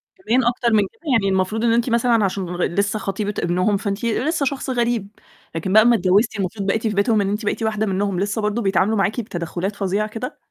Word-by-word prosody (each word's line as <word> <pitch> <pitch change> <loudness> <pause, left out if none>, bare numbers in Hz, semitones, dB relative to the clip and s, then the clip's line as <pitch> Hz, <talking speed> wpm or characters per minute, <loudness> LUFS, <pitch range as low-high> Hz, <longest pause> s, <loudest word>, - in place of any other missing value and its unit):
كمان 260 - +1
أكتر 240 -1 +1
من 215 - +5
كده؟ - - -31
يعني 210 -6 +2
المفروض 190 +4 0
إن 230 -1 +3
أنتِ 235 +1 +1
مثلًا 235 -2 +2
عشان 190 0 -2
لغ 175 0 -3
لسه 200 +4 -1
خطيبة 205 +1 -3
ابنهم 180 +4 +1
فأنتِ 200 +2 -3
لسه 280 +6 0
شخص 270 0 -3
غريب، 235 -5 0 0.5
لكن 185 +4 -2
بقى 220 - +8
أمّا 235 +1 +5
اتجوزتِ 200 +4 +2
المفروض 195 +1 -3
بقيتِ 220 +2 0
في 210 - -1
بيتهم 205 +1 +2
إن 195 - -1
أنتِ 210 +1 -3
بقيت 225 - -1
واحدة 220 0 0
منهم، 195 -1 -1
لسه 205 +3 -1
برضه 210 +2 -1
بيتعاملوا 195 +1 +1
معاكِ 200 +4 0
بتدخّلات 180 0 -4
فظيعة 200 +2 -1
كده؟ 235 +4 -6
210 Hz, 215 wpm, -21 LUFS, 195-230 Hz, 0.5 s, بقى